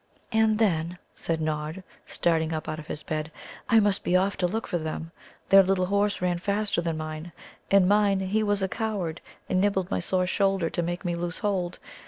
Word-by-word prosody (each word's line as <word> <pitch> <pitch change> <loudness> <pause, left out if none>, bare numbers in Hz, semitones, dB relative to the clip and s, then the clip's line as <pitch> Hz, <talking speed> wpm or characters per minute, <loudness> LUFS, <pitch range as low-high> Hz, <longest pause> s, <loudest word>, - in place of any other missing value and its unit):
"Ah, 220 0 +4
then," 180 -6 +1 0.2
said 165 -1 -2
Nod, 155 +3 -3 0.2
starting 165 -2 +1
up 155 -1 -4
out 155 0 -3
of 155 - -10
his 150 - -5
bed, 155 -2 -3 0.4
"I 225 -2 +6
must 205 -2 +2
be 180 - +1
off 195 +2 +1
to 180 - +1
look 220 +5 -3
for 175 - -2
them. 160 +1 -5 0.4
Their 195 0 +9
Little 190 -1 +1
Horses 200 0 0
ran 175 -1 +1
faster 200 0 0
than 165 -2 -2
mine. 155 +2 -6 0.4
And 195 -2 +5
mine, 205 -1 +3
he 195 +3 0
was 205 -2 +1
a - - +2
coward, 190 -6 -3 0.3
and 185 - +1
nibbled 195 -2 +1
my 95 - +1
sore 185 - +1
shoulder 195 -2 +1
to - - -1
make 175 +1 -3
me 175 - 0
loose 170 0 -3
hold. 190 -4 -1
180 Hz, 205 wpm, -27 LUFS, 165-200 Hz, 0.4 s, Their